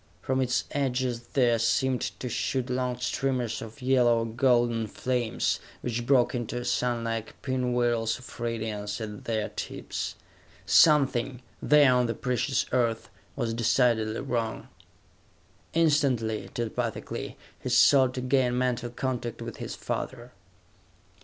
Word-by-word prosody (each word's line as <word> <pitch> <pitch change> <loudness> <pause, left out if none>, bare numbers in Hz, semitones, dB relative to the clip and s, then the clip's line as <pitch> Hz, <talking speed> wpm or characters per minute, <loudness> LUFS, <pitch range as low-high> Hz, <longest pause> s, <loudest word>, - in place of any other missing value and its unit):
From 130 0 0
its 125 -1 +1
edges 130 -3 -1
there 120 -4 +3
seemed 130 +2 +1 0.2
to 125 - -4
shoot 125 +1 -1
long 125 -1 -1
streamers 125 -2 -1
of 115 +4 -10
yellow 125 -3 +4
or - - -1
golden 120 -1 +2
flames, 125 0 -1 0.2
which 120 0 -3
broke 125 -3 +4
into 120 0 -3
sunlike 115 -3 -1
pinwheels 120 -3 0
of 130 0 -13
radiance 110 -3 -3
at 105 -2 -7
their 110 -2 -1
tips. - - -5 0.5
Something, 130 +1 +4 0.2
there 145 -3 +6
on 125 -1 +3
the 115 - -2
precious 125 +3 0
Earth, 115 -3 0 0.2
was 120 -4 -1
decidedly 115 -1 +2
wrong! 115 -2 -3 1.1
Instantly, 135 -9 +2
telepathically, 120 -2 -4 0.2
he - - -5
sought 130 +1 +5
to 130 - -2
gain 125 -1 +2
mental 125 -1 0
contact 120 -1 -3
with - - -7
his - - -5
father. - - -5
125 Hz, 125 wpm, -27 LUFS, 115-130 Hz, 1.1 s, there